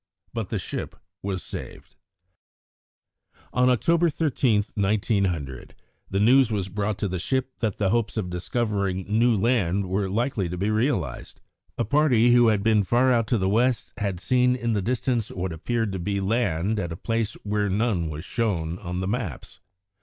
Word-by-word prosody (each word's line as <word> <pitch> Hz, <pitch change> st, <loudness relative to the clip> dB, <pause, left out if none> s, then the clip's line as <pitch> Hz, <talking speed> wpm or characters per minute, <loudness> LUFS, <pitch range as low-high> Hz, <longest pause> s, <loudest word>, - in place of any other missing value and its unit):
But -, -, -3 dB
the -, -, -1 dB
ship -, -, -5 dB, 0.3 s
was 95 Hz, -2 st, -3 dB
saved. -, -, -9 dB, 1.6 s
On 125 Hz, 0 st, +4 dB
October 170 Hz, +7 st, +3 dB
13, 130 Hz, -9 st, +1 dB
1900, 95 Hz, -, -1 dB, 0.3 s
the 95 Hz, -, 0 dB
news 125 Hz, +4 st, +5 dB
was 100 Hz, -3 st, -2 dB
brought 100 Hz, +1 st, -2 dB
to 100 Hz, -, -1 dB
the 90 Hz, -1 st, -3 dB
ship 130 Hz, +6 st, -2 dB
that 110 Hz, -5 st, -1 dB
the 100 Hz, -3 st, +1 dB
hopes 115 Hz, 0 st, 0 dB
of 90 Hz, -5 st, -2 dB
discovering 100 Hz, 0 st, -1 dB
new 115 Hz, +2 st, +3 dB
land 100 Hz, -4 st, +1 dB
were 95 Hz, +1 st, -1 dB
likely 110 Hz, -3 st, -1 dB
to 90 Hz, -, -4 dB
be 100 Hz, +4 st, 0 dB
realised. 120 Hz, +7 st, -1 dB, 0.4 s
A -, -, 0 dB
party 120 Hz, -2 st, +4 dB
who 120 Hz, -1 st, +6 dB
had 105 Hz, -3 st, +2 dB
been 110 Hz, -1 st, +4 dB
far 120 Hz, +6 st, +3 dB
out 115 Hz, -3 st, +2 dB
to 120 Hz, -, +2 dB
the 95 Hz, -2 st, 0 dB
west 120 Hz, +3 st, +1 dB
had 100 Hz, -4 st, -2 dB
seen 125 Hz, +4 st, +2 dB
in 120 Hz, -2 st, -1 dB
the 105 Hz, -, 0 dB
distance 120 Hz, +1 st, -1 dB
what 90 Hz, -2 st, -4 dB
appeared 110 Hz, +6 st, -1 dB
to 95 Hz, -, -4 dB
be 100 Hz, +3 st, -1 dB
land 105 Hz, -1 st, 0 dB
at 85 Hz, -4 st, -3 dB
a 80 Hz, -, -5 dB
place 115 Hz, 0 st, -1 dB
where 105 Hz, 0 st, 0 dB
none 95 Hz, -5 st, 0 dB
was 80 Hz, +2 st, -6 dB
shown 90 Hz, -8 st, -1 dB
on 90 Hz, -1 st, -4 dB
the 95 Hz, -, -2 dB
maps. 105 Hz, -, -4 dB
105 Hz, 175 wpm, -25 LUFS, 95-120 Hz, 1.6 s, who